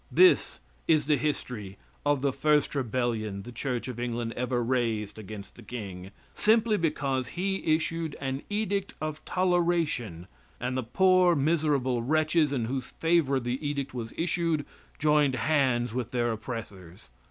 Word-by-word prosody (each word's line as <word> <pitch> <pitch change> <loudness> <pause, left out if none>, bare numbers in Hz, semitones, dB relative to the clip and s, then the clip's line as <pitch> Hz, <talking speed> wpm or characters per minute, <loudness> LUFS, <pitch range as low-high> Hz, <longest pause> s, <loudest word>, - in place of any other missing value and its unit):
This 365 0 +5 0.3
is 155 -3 +4
the 150 0 +4
history 125 -9 -3 0.3
of 145 -2 +2
the 140 -2 +2
first 150 0 +2
rebellion 115 -6 -1
the 120 - -9
Church 125 +1 -3
of 125 -2 -6
England 120 -1 -2
ever 125 0 0
raised 115 -4 -1
against 105 -1 -9
the - - -14
king, 100 -6 -7 0.2
simply 220 0 +3
because 140 -7 0
he 190 -4 +1
issued 165 -1 -3
an 135 0 -3
edict 205 -2 -1
of 155 0 -4
toleration 170 - 0 0.3
and 125 +1 -2
the 130 - 0
poor, 180 +7 +4
miserable 145 -5 +1
wretches 155 +3 +2
in 125 -5 0
whose 130 +2 -3
favor 160 -5 +1
the 125 +3 -3
edict 140 -2 -2
was 115 -3 -5
issued 165 -3 0 0.3
joined 150 -3 +3
hands 130 -5 +1
with 120 -2 -2
their 120 -1 0
oppressors. 105 - -7
135 Hz, 145 wpm, -28 LUFS, 120-155 Hz, 0.3 s, This